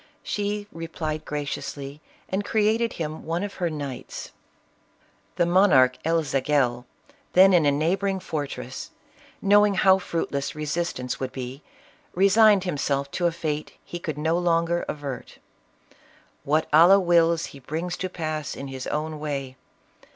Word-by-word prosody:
She 205 Hz, 0 st, -2 dB
replied 160 Hz, -2 st, -5 dB
graciously 145 Hz, 0 st, -5 dB, 0.3 s
and 195 Hz, +2 st, -2 dB
created 220 Hz, +2 st, +1 dB
him 155 Hz, -1 st, -5 dB
one 165 Hz, +4 st, -2 dB
of 205 Hz, -1 st, -4 dB
her 175 Hz, -, +1 dB
knights. 145 Hz, -5 st, -6 dB, 1.0 s
The 175 Hz, -, +2 dB
monarch 170 Hz, -9 st, +5 dB
El 165 Hz, 0 st, +2 dB
Zagel, 135 Hz, -3 st, 0 dB, 0.5 s
then 190 Hz, +1 st, +7 dB
in 165 Hz, -5 st, +4 dB
a -, -, +5 dB
neighboring 190 Hz, +7 st, 0 dB
fortress, 135 Hz, -6 st, -5 dB, 0.5 s
knowing 205 Hz, 0 st, +5 dB
how 190 Hz, +1 st, +5 dB
fruitless 160 Hz, -5 st, -3 dB
resistance 150 Hz, -4 st, -3 dB
would 130 Hz, -1 st, -3 dB
be, 130 Hz, +2 st, -7 dB, 0.5 s
resigned 200 Hz, +1 st, +5 dB
himself 140 Hz, -5 st, -1 dB
to 175 Hz, -2 st, +1 dB
a -, -, +1 dB
fate 155 Hz, -2 st, -4 dB
he 175 Hz, -, -6 dB
could 155 Hz, -4 st, -4 dB
no 160 Hz, +3 st, +1 dB
longer 170 Hz, 0 st, +1 dB
avert. 140 Hz, -3 st, -6 dB, 0.5 s
" -, -, -30 dB
What 155 Hz, +3 st, +1 dB
Allah 175 Hz, +6 st, +8 dB
wills 170 Hz, -2 st, +3 dB
he 140 Hz, -, -11 dB
brings 165 Hz, +7 st, -4 dB
to 185 Hz, -, -3 dB
pass 155 Hz, -4 st, -4 dB
in 140 Hz, -, -7 dB
his 130 Hz, -1 st, -6 dB
own 155 Hz, 0 st, -3 dB
way. 140 Hz, -3 st, -4 dB
160 Hz, 140 wpm, -25 LUFS, 145-180 Hz, 1.0 s, Allah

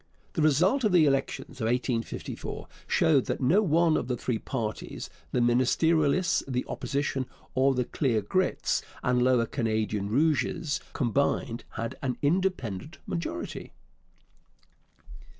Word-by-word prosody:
The -, -, -1 dB
result 175 Hz, -, +3 dB
of 210 Hz, -4 st, +2 dB
the 170 Hz, -3 st, +6 dB
elections 135 Hz, -2 st, -1 dB
of -, -, 0 dB
1854 120 Hz, 0 st, -2 dB, 0.2 s
showed 145 Hz, -5 st, +3 dB
that -, -, -2 dB
no 150 Hz, +11 st, +4 dB
one 165 Hz, -3 st, +3 dB
of -, -, -1 dB
the 125 Hz, -1 st, -1 dB
three 115 Hz, -2 st, -2 dB
parties 110 Hz, -4 st, -4 dB, 0.2 s
the 125 Hz, -, +1 dB
Ministerialists, 150 Hz, +7 st, +3 dB
the 125 Hz, -2 st, -1 dB
Opposition, 140 Hz, -2 st, -2 dB, 0.3 s
or 135 Hz, +1 st, +3 dB
the 125 Hz, -1 st, 0 dB
Clear 120 Hz, -7 st, 0 dB
Grits 185 Hz, -, 0 dB, 0.2 s
and 125 Hz, 0 st, +2 dB
Lower 125 Hz, -2 st, +4 dB
Canadian 110 Hz, -3 st, -1 dB
Rouges 155 Hz, -, +1 dB
combined 120 Hz, -2 st, 0 dB
had 115 Hz, 0 st, -4 dB
an 130 Hz, -2 st, -2 dB
independent 150 Hz, -, -1 dB
majority. 165 Hz, -, -5 dB
130 Hz, 125 wpm, -28 LUFS, 120-160 Hz, 0.3 s, the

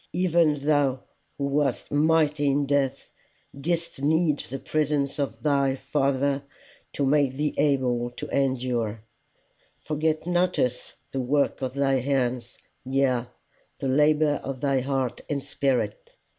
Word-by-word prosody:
Even 170 Hz, -5 st, +2 dB
thou 140 Hz, -3 st, +1 dB, 0.3 s
who 140 Hz, -, -1 dB
wast 140 Hz, -2 st, 0 dB
mighty 150 Hz, -1 st, +2 dB
in 140 Hz, +1 st, +2 dB
death, 140 Hz, -1 st, -1 dB, 0.4 s
didst 165 Hz, +1 st, -3 dB
need 155 Hz, 0 st, +2 dB
the 135 Hz, -, -5 dB
presence 145 Hz, -1 st, -1 dB
of 140 Hz, -, -3 dB
thy 140 Hz, -3 st, +2 dB
Father 140 Hz, 0 st, 0 dB, 0.5 s
to 140 Hz, -, 0 dB
make 140 Hz, -1 st, +3 dB
thee 150 Hz, +2 st, -1 dB
able 130 Hz, -4 st, +1 dB
to 120 Hz, -, -7 dB
endure: 125 Hz, -5 st, -1 dB, 0.8 s
forget 155 Hz, +1 st, 0 dB
not 180 Hz, +1 st, +1 dB
us 125 Hz, 0 st, -1 dB, 0.2 s
the 135 Hz, -, -2 dB
work 140 Hz, +3 st, +1 dB
of 130 Hz, 0 st, -3 dB
thy 135 Hz, -1 st, +2 dB
hands, 125 Hz, -2 st, -1 dB, 0.3 s
yea, 130 Hz, -2 st, +1 dB, 0.5 s
the 135 Hz, -, -3 dB
labour 150 Hz, +2 st, +3 dB
of 135 Hz, -1 st, -5 dB
thy 135 Hz, -1 st, +1 dB
heart 130 Hz, -1 st, -2 dB
and 140 Hz, -2 st, -2 dB
spirit. 125 Hz, -7 st, -2 dB
140 Hz, 130 wpm, -26 LUFS, 130-150 Hz, 0.8 s, make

